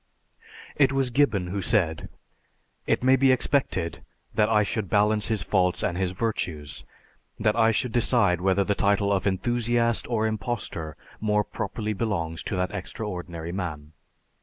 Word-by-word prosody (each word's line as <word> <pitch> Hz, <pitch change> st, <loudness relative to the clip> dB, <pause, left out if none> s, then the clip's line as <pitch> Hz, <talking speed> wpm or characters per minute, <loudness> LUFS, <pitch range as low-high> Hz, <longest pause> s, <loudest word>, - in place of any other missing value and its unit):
It 135 Hz, -2 st, +4 dB
was 135 Hz, -2 st, 0 dB
Gibbon 115 Hz, -9 st, +2 dB
who 95 Hz, +3 st, -3 dB
said, 95 Hz, -8 st, 0 dB, 0.8 s
"It -, -, +1 dB
may 130 Hz, +1 st, +6 dB
be 135 Hz, 0 st, +4 dB
expected 120 Hz, -, 0 dB, 0.3 s
that 105 Hz, 0 st, +2 dB
I 105 Hz, -2 st, +4 dB
should 100 Hz, 0 st, -3 dB
balance 105 Hz, +1 st, +2 dB
his 110 Hz, -3 st, 0 dB
faults 90 Hz, -2 st, +1 dB
and 85 Hz, -, 0 dB
his 95 Hz, 0 st, 0 dB
virtues, 90 Hz, -7 st, -3 dB, 0.6 s
that 105 Hz, -1 st, +2 dB
I 115 Hz, -1 st, +4 dB
should 115 Hz, +2 st, -1 dB
decide 100 Hz, -6 st, +2 dB
whether 95 Hz, +1 st, +2 dB
the 100 Hz, -, +1 dB
title 100 Hz, 0 st, +2 dB
of 95 Hz, 0 st, 0 dB
enthusiast 120 Hz, +3 st, +1 dB
or 110 Hz, -2 st, +1 dB
impostor 105 Hz, -, -4 dB, 0.2 s
more 105 Hz, -1 st, +1 dB
properly 110 Hz, 0 st, -4 dB
belongs 85 Hz, -7 st, -2 dB
to -, -, -2 dB
that 90 Hz, 0 st, -1 dB
extraordinary 90 Hz, -5 st, -5 dB
man.... 80 Hz, -5 st, -5 dB
105 Hz, 150 wpm, -26 LUFS, 90-115 Hz, 0.8 s, may